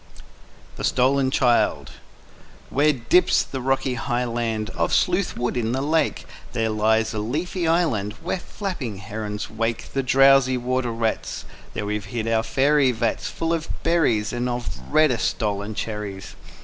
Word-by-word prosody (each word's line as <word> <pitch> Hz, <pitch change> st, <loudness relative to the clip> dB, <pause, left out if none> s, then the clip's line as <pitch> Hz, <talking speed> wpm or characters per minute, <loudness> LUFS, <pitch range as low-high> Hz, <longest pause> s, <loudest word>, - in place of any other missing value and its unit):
_ -, -, -15 dB, 0.6 s
THE -, -, -6 dB
STOLEN 130 Hz, +1 st, +2 dB
CHILD 125 Hz, -3 st, +2 dB, 0.8 s
WHERE 150 Hz, +2 st, +3 dB
dips 135 Hz, +8 st, +3 dB
the 130 Hz, -, -6 dB
rocky 135 Hz, 0 st, 0 dB
highland 120 Hz, -3 st, -2 dB
Of -, -, 0 dB
Sleuth 180 Hz, 0 st, +1 dB
Wood 120 Hz, +1 st, -1 dB
in 115 Hz, -1 st, -1 dB
the 135 Hz, -, -1 dB
lake, 160 Hz, +2 st, 0 dB, 0.3 s
There 115 Hz, -2 st, 0 dB
lies 110 Hz, +1 st, +2 dB
a 110 Hz, -, -2 dB
leafy 160 Hz, -, -2 dB
island 135 Hz, -, +1 dB
Where -, -, -2 dB
flapping 170 Hz, -, -5 dB
herons 105 Hz, +1 st, -5 dB
wake 115 Hz, +1 st, -3 dB
The 135 Hz, -, +1 dB
drowsy 135 Hz, 0 st, +5 dB
water 125 Hz, 0 st, -1 dB
rats; 115 Hz, -1 st, -2 dB, 0.3 s
There 105 Hz, -, -2 dB
we've 105 Hz, -1 st, -3 dB
hid 110 Hz, +1 st, -4 dB
our 115 Hz, -1 st, +2 dB
faery 135 Hz, +4 st, +3 dB
vats. 115 Hz, -1 st, -1 dB
Full 165 Hz, 0 st, -2 dB
of 165 Hz, -1 st, -3 dB
berries, 125 Hz, -11 st, +2 dB
And 120 Hz, +1 st, -1 dB
of 120 Hz, 0 st, -3 dB
reddest 150 Hz, -7 st, +3 dB
stolen 105 Hz, 0 st, -3 dB
cherries. 105 Hz, -4 st, -5 dB
120 Hz, 150 wpm, -23 LUFS, 110-135 Hz, 0.8 s, drowsy